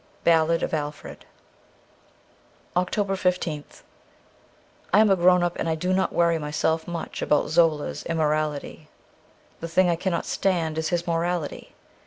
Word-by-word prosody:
' - - -33
Ballad 165 0 +3
of - - -2
Alfred: 150 -1 -5 1.5
320 - - -32
OCTOBER 195 +2 0
15th 180 -5 -2 1.1
I 200 - +5
AM 215 -2 +5
grown 180 -1 +4
up, 175 0 -1
and 165 - -1
I 160 - +1
do 180 +4 -1
not 190 0 +1
worry 170 -1 +2
myself 160 +2 -1
much 170 -2 -5
about 150 - +1
Zola's 160 -3 +1
immorality. 155 -1 -2 0.7
The 165 - -5
thing 175 +2 +3
I - - +1
cannot 170 0 -2
stand 165 -5 -1
is 160 - -1
his 175 -1 -1
morality. 170 -2 -3
165 Hz, 145 wpm, -24 LUFS, 160-180 Hz, 1.5 s, I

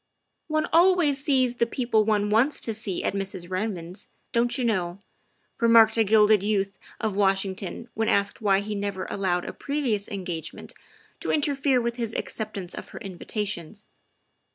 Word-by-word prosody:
" - - -52
One 310 -1 +1
always 335 -5 +4
sees 255 -4 +2
the 235 - +2
people 235 -3 +1
one 210 -1 +1
wants 245 +8 +3
to 225 - -1
see 210 -4 -3
at - - 0
Mrs. 190 -2 -4
Redmond's, 185 -2 -4 0.2
don't 240 +2 +2
you 255 - 0
know?" 180 -6 0 0.6
remarked 230 -1 +6
a 225 - +4
gilded 215 -1 +5
youth 200 -1 -1 0.2
of 215 -3 -2
Washington 195 +1 0
when 225 0 0
asked 200 +3 +1
why 200 -2 +3
he 210 +1 -4
never 200 -2 -3
allowed 180 -3 0
a - - -5
previous 265 -9 -2
engagement 175 -5 -5 0.5
to - - -5
interfere 280 -3 +2
with 235 0 -2
his 230 -2 -3
acceptance 195 -5 -4
of - - -8
her - - -9
invitations. 200 -1 -4
215 Hz, 160 wpm, -26 LUFS, 195-235 Hz, 0.6 s, remarked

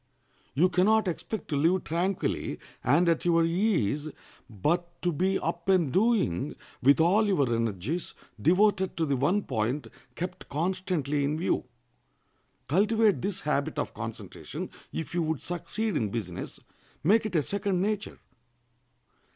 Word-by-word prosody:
You 165 +6 +5
can 180 +2 +3
not 220 -1 +4
expect 185 +4 -4
to 150 - -1
live 170 +6 +2
tranquilly 175 +4 -1 0.3
and 150 +8 +4
at 165 -1 +2
your 170 -1 +3
ease, 165 - +1 0.4
but 170 - -1
to 175 - +2
be 190 +5 +1
up 170 +3 -3
and 175 -8 +3
doing, 200 - +2 0.3
with 140 +4 +5
all 195 +7 +4
your 140 -12 +2
energies 115 - -2 0.3
devoted 190 +2 +3
to 165 - +1
the 140 -2 +1
one 175 +11 +1
point 125 +4 -1 0.3
kept 180 +1 -6
constantly 165 -3 -1
in 145 +2 0
view. 170 - 0 1.0
Cultivate 215 +5 +3
this 195 0 -2
habit 145 -2 -1
of - - -2
concentration - - -7 0.2
if 160 - -5
you 175 - +1
would 160 -2 -1
succeed 200 +4 -3
in 110 -7 0
business; 100 -5 -5 0.4
make 215 +6 +4
it 195 - -6
a 155 - +3
second 200 0 -1
nature. 205 +2 -2
170 Hz, 145 wpm, -28 LUFS, 145-190 Hz, 1.0 s, You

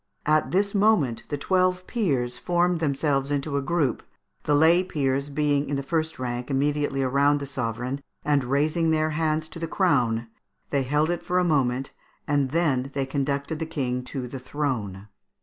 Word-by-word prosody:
At 155 0 +2
this 200 +2 +1
moment 195 - +3
the 145 - -2
twelve 185 +3 +1
peers 135 - -1
formed 175 0 +1
themselves 140 -2 0
into 145 0 -1
a 140 - +1
group, 140 -3 0 0.4
the 150 - +3
lay 165 +4 +5
peers 140 -5 -1
being 145 0 0
in 145 - 0
the 140 - -2
first 160 +2 -1
rank, 125 0 -4
immediately 140 0 0
around 140 +2 +3
the 140 - -4
sovereign, 125 0 -3 0.2
and 145 -2 +2
raising 150 +6 +1
their 155 0 +2
hands 155 0 0
to - - -9
the 165 - -3
crown, 125 - +1 0.4
they 140 - +2
held 150 +5 +1
it 175 - -2
for 180 - -1
a 180 - +4
moment, 135 -5 +1 0.4
and 145 -3 +1
then 140 -4 +1
they 135 -1 0
conducted 140 +3 -2
the 160 - -3
King 125 -5 -2
to 130 -2 -5
the 130 +2 -7
throne. 120 -8 -3
145 Hz, 175 wpm, -25 LUFS, 135-160 Hz, 0.4 s, lay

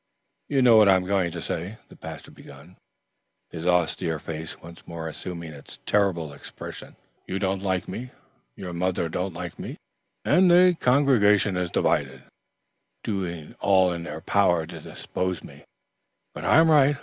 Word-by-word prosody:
"You 135 -3 +2
know 120 -3 +7
what 105 -2 +7
I 95 - +7
am 90 0 0
going 95 -2 +1
to 85 0 -6
say," 90 +6 -4
the - - -14
pastor - - -9
began, 70 +6 -15 0.8
his 85 +1 -5
austere 85 -1 +1
face 80 +1 -7
once 85 0 -13
more 80 -1 -6
assuming 85 0 -6
its 70 - -12
terrible 90 -7 +1
expression. 70 - -10 0.3
"You 95 - -2
don't 95 -1 -1
like 95 -2 -1
me, 125 +2 -6 0.5
your 90 -2 -7
mother 90 -1 -1
don't 90 +4 -3
like - - -7
me, - - -6 0.5
and 180 0 +5
the 180 +1 +6
congregation 115 -7 +4
is 90 -1 -1
divided, 65 -5 0 0.8
doing 90 -7 -4
all 95 -2 +3
in 85 - -5
their 80 -1 -7
power 90 -5 +2
to - - -9
dispossess 90 -1 -4
me; - - -13 0.7
but - - -7
I - - +5
am 160 0 +6
right. 145 -1 +5
90 Hz, 160 wpm, -25 LUFS, 85-105 Hz, 0.8 s, know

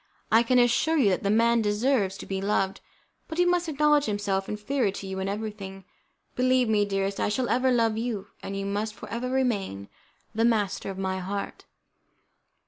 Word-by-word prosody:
I 225 - +6
can 250 +2 +2
assure 245 +7 +3
you 225 -9 +4
that 185 - 0
that 200 - -1
man 230 +2 +3
deserves 210 -2 +1
to - - -8
be 190 0 -3
loved, 195 -1 0 0.5
but 320 - -6
he 355 - +4
must 355 -1 +1
acknowledge 300 0 +3
himself 200 -2 -1
inferior 210 +3 0
to 195 0 -6
you 190 0 -4
in 190 +1 -2
everything. 200 -2 -6 0.5
Believe 255 -1 +3
me, 210 -2 +3
dearest, 195 0 -2
I - - +1
shall 245 +4 -1
ever 255 +2 +2
love 230 -3 +2
you, 225 -4 -3
and 195 - -5
you 195 - -3
must 210 +2 -2
for 200 - -10
ever 245 +2 -3
remain 205 - -1 0.4
the 225 +1 +1
master 210 -5 +1
of 190 - -6
my 190 0 -2
heart." 200 +2 -5
210 Hz, 190 wpm, -26 LUFS, 195-245 Hz, 0.5 s, I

